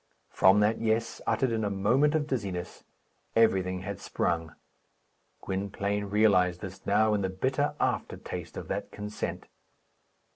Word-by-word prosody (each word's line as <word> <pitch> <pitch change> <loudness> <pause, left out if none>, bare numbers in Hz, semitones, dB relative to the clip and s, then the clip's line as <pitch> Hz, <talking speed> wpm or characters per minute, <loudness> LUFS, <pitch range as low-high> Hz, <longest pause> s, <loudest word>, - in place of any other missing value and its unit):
From 95 +2 +5
that 105 +2 +2
"Yes," 115 0 0
uttered 115 +3 +2
in 110 -1 0
a 105 - 0
moment 125 +10 +2
of 155 -2 +1
dizziness, 100 - -4 0.5
everything 95 -5 +3
had 100 0 -5
sprung. 85 -1 -2 0.9
Gwynplaine 100 +1 -2
realized 95 -4 +3
this 95 -2 -8
now 110 +1 +3
in 105 - +1
the 95 - 0
bitter 130 +10 0
aftertaste - - -3
of - - -6
that - - -3
consent. 105 0 -5
105 Hz, 135 wpm, -29 LUFS, 95-110 Hz, 0.9 s, From